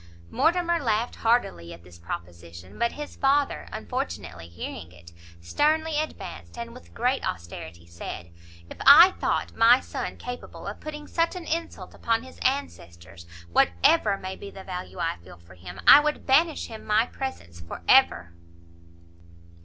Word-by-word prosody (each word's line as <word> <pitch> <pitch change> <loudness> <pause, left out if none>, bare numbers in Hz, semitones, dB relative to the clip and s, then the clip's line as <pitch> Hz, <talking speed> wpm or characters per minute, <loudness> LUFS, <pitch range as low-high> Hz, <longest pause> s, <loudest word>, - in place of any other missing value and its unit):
Mortimer 345 0 +2
laughed 230 -3 -1
heartily 90 - 0
at 85 - -19
this 85 -1 -16
proposition; 85 +1 -9
but 235 0 +1
his 295 0 -8
father, 280 +1 +1
unfortunately 90 - -5
hearing 85 -1 -8
it, 85 -1 -15 0.3
sternly 305 - +1
advanced, 310 -5 -7
and 235 0 -6
with 250 - -15
great 250 +3 0
austerity 85 0 -6
said, 85 0 -8 0.4
"If - - -11
I 335 +7 +10
thought - - -1
my 235 +3 +6
son - - -6
capable 245 0 -8
of - - -6
putting 300 -1 -7
such 335 +3 0
an 360 -2 -7
insult 330 +1 -4
upon 230 0 -1
his 260 - -14
ancestors, 85 - -4 0.2
whatever 195 - +3
may 190 0 -6
be 200 - -9
the 195 -1 -11
value 180 -1 -7
I 165 -1 -2
feel 85 +1 -15
for 85 +1 -18
him, 90 +1 -11
I - - +10
would 300 0 -2
banish 310 +4 +3
him 220 -1 -9
my 215 +2 +2
presence 85 - -7
for 85 - -9
ever." 85 -1 +4
210 Hz, 155 wpm, -26 LUFS, -, 0.4 s, I